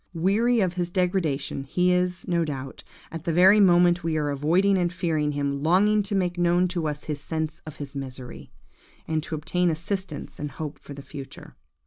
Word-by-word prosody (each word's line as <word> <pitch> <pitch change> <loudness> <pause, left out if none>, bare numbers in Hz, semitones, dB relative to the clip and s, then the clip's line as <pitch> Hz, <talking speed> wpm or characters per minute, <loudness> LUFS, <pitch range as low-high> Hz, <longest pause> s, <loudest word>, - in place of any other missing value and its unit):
Weary 215 +7 +2
of 185 -2 +1
his 175 -1 -2
degradation, 175 -7 -1
he 180 +6 +1
is, 180 0 -1
no 170 -1 +1
doubt, 135 -4 -6 0.3
at 165 -1 -6
the 170 - +1
very 185 +5 +6
moment 175 -3 +5
we 160 -1 0
are 145 -1 0
avoiding 170 +8 +2
and 175 -2 +1
fearing 160 -5 -1
him, 140 -1 -2
longing 200 +7 +3
to 200 0 -3
make 180 -2 0
known 175 +1 +3
to 170 -3 -2
us 150 -1 -3
his 150 -2 -4
sense 160 0 -3
of 155 - -7
his 140 -1 -7
misery, 130 - -8 0.6
and 160 -1 0
to 160 - -5
obtain 175 +4 0
assistance 170 0 -4
and 145 -2 -5
hope 150 0 -6
for 140 - -10
the 140 - -9
future. 140 -1 -10
170 Hz, 190 wpm, -25 LUFS, 150-180 Hz, 0.6 s, very